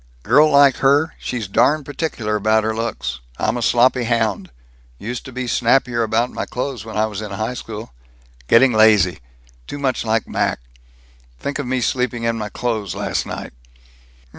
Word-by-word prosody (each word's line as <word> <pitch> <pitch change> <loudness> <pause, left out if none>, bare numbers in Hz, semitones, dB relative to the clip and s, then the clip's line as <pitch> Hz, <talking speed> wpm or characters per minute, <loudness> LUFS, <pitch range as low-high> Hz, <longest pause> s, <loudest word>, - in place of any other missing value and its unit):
"Girl 150 +6 +5
like 140 -2 +5
her, 145 +4 +3
she's 115 -5 -4
darn 145 +10 +2
particular 135 -7 -3
about 110 +1 +2
her 110 0 -1
looks. 65 - -3 0.2
I'm - - 0
a 120 - -3
sloppy 120 +1 +3
hound. 110 -5 0 0.5
Used 120 - -6
to 130 - -9
be 130 0 -4
snappier 120 0 +2
about 115 +2 0
my - - -4
clothes 125 -3 -4
when 110 -1 -7
I 110 - +3
was 105 -2 -5
in 105 - -6
high 110 +5 -3
school. 110 -2 -8 0.5
Getting 125 - +5
lazy 105 -4 +4 0.5
too - - -6
much 135 -3 -1
like 110 0 0
Mac. - - -1 0.8
Think 140 - -4
of - - -3
me 130 0 -1
sleeping 125 -1 -1
in 115 0 0
my 105 -2 -4
clothes 110 -3 -3
last - - -2
night!" - - -7
115 Hz, 170 wpm, -20 LUFS, 110-130 Hz, 0.8 s, Girl